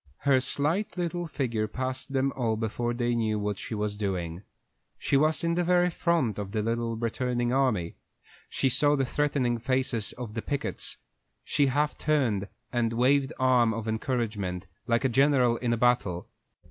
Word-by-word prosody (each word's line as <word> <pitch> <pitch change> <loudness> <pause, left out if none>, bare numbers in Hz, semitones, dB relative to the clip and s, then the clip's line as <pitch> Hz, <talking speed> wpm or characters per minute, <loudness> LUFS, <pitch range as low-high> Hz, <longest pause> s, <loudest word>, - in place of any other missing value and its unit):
Her 140 -2 +4
slight 155 +11 -1
little 175 0 -2
figure 120 -8 -1
passed 130 +3 -4
them 135 0 +1
all 115 -4 0
before 115 +2 -2
they 120 0 0
knew 110 -2 0
what 105 -1 -2
she 110 - -5
was 105 0 -1
doing. 95 -5 -3 0.6
She - - 0
was 155 +4 +3
in 170 0 +1
the 175 +1 +1
very 180 0 +3
front 160 - 0
of 100 0 -5
the 105 -1 0
little 115 0 -1
returning 120 +1 -1
army. 125 -11 +1 0.5
She 135 - 0
saw 145 +3 +3
the 135 -2 +1
threatening 130 -3 0
faces 125 -3 0
of 120 -4 -7
the 115 - -3
pickets; 140 +3 -3 0.5
she 145 -2 +2
half 145 +3 0
turned, 125 -10 +1 0.3
and 115 -2 +1
waved 135 +3 +3
an - - -20
arm 120 -3 +4
of 115 0 -5
encouragement, 110 -6 -2 0.2
like 120 +2 +2
a - - +6
general 130 -2 +3
in 120 -1 -1
a 120 - +1
battle. 115 -8 +1
120 Hz, 170 wpm, -28 LUFS, 110-140 Hz, 0.6 s, a